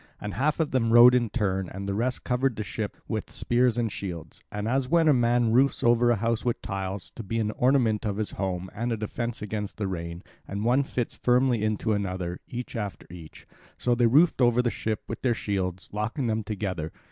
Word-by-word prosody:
And 105 -1 -5
half 145 - 0
of 160 -2 0
them 115 -3 +1
rowed 120 +2 +9
in 120 -3 +2
turn, 95 -5 -1
and 100 +1 -6
the 100 - -1
rest 125 +5 -1
covered 125 0 0
the 105 - -3
ship 100 - -5
with - - -3
spears 120 0 +1
and 115 -3 0
shields. 85 -7 -6
And 105 +1 -3
as 130 +1 0
when 165 0 +4
a 150 - +6
man 120 -2 +2
roofs 135 +4 +3
over 120 0 +4
a 120 - +4
house 115 +1 -1
with 120 -1 0
tiles, 95 0 -4
to - - -8
be 115 +2 -3
an 110 -1 0
ornament 120 -4 +2
of 105 -3 -2
his 110 -1 -2
home 95 -1 -3
and 120 +3 -2
a 115 - 0
defence 115 +2 -4
against 105 0 -4
rain, 85 -3 -4 0.2
and 100 +2 -3
one 125 +4 +4
the 140 - -5
fits 120 -2 -2
firmly 125 -2 +2
into 110 +1 0
another, 95 -3 -3
each 125 +1 -6
after 105 -4 -4
each; 85 -3 -12 0.3
so 125 - +1
they 120 0 +3
roofed 150 +4 +4
over 120 0 +4
the 120 - +1
ship 110 -1 -3
with - - -6
their 120 -3 +2
shields, 95 -4 -3
locking 110 +6 -2
them 110 -1 0
together. 95 -6 -3
110 Hz, 215 wpm, -27 LUFS, 100-120 Hz, 0.3 s, rowed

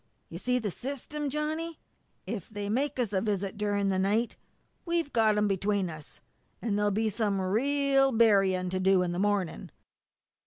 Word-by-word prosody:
You 170 - -7
see 250 +4 +1
the 215 -5 -2
system, 280 - -4
Johnny? 310 +3 -3 0.5
If 200 -1 -5
they 205 -2 -4
make 270 +7 0
us 235 -5 -1
a 190 - +2
visit 200 -3 -2
during 205 -1 0
the 190 -1 +1
night 210 +5 +1 0.5
we've 335 -4 -1
got 220 -2 +3
'em 210 0 +3
between 195 -1 0
us, 155 -2 -11 0.4
and 220 -3 -1
there'll 205 0 +2
be 220 +2 0
some 210 -2 0
real 270 +7 +2
burying 195 -6 +3
to 185 - -1
do 190 -1 +4
in 175 - -1
the 175 - -3
morning!" 200 -4 -1
210 Hz, 170 wpm, -29 LUFS, 195-250 Hz, 0.5 s, do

